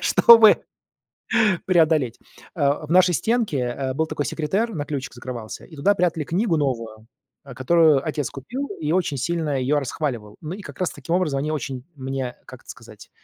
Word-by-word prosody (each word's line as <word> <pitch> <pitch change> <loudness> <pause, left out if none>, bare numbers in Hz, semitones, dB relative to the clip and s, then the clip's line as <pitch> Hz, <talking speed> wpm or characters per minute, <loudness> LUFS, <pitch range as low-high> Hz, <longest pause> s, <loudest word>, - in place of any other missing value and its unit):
чтобы 225 -2 +7 1.0
преодолеть. 160 -9 +2 0.4
Э, 145 +2 0
в 155 - -8
нашей 180 0 +5
стенке, 225 - 0
э, 130 +2 -2
был 160 +3 0
такой 145 - -3
секретер, 200 +9 -1
на 145 -2 -3
ключик 140 -3 -5
закрывался, 120 -3 -8
и 160 - -14
туда 195 +8 +2
прятали 170 -4 0
книгу 175 +1 0
новую, 115 -6 -3 0.4
э, 130 - -10
которую 150 +2 +3
отец 150 -4 -2
купил 255 - -6
и 155 0 -2
очень 170 -6 0
сильно 155 -1 -1
её 145 +3 +1
расхваливал. 120 -6 -4
Ну, 160 +3 -5
и 205 - -8
как - - -11
раз 180 - -1
таким 155 +5 -3
образом 150 -7 0
они 155 +2 -2
очень 135 -3 -4
мне, 130 -2 -4
как - - -12
это - - -23
сказать - - -12
150 Hz, 175 wpm, -22 LUFS, 130-170 Hz, 1.0 s, чтобы